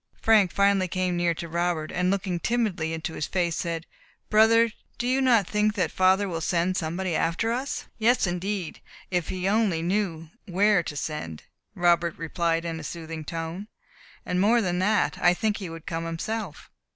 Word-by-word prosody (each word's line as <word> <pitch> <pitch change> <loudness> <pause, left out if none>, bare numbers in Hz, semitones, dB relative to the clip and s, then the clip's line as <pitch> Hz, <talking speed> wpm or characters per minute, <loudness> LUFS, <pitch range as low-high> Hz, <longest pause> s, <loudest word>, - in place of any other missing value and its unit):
Frank 215 -5 +4
finally 200 -1 +3
came 185 0 -1
near 175 -1 +1
to 170 - -6
Robert, 170 -1 -1
and 180 +1 0
looking 190 -2 -1
timidly 200 -8 0
into 160 0 -4
his 150 - -3
face, 175 -3 0
said, 165 -1 -3 0.5
"Brother, 225 +1 +5 0.3
do 240 - -3
you 260 +2 +2
not 235 -6 +4
think 210 +2 +1
that 185 - 0
father 190 +2 +3
will 165 -3 -3
send 175 +2 0
somebody 175 +1 -2
after 170 +9 0
us?" 260 +4 -3
"Yes, 235 +1 +3
indeed; 180 0 -3 0.3
if 175 -3 -1
he 185 0 -2
only 200 -6 +2
knew 170 -4 -1 0.2
where 200 +1 +3
to 150 - -6
send," 140 - -5 0.3
Robert 175 -1 +2
replied 165 +1 -1
in 165 -1 -3
a - - -8
soothing 160 0 -6
tone; 165 +5 -5 0.6
"and 180 0 0
more 225 +4 +4
than 180 -5 0
that, 210 +3 +1
I 175 0 +5
think 215 +2 0
he 190 -5 -6
would 165 -1 -9
come 165 0 -3
himself." 180 +3 -5
180 Hz, 175 wpm, -26 LUFS, 165-205 Hz, 0.6 s, Brother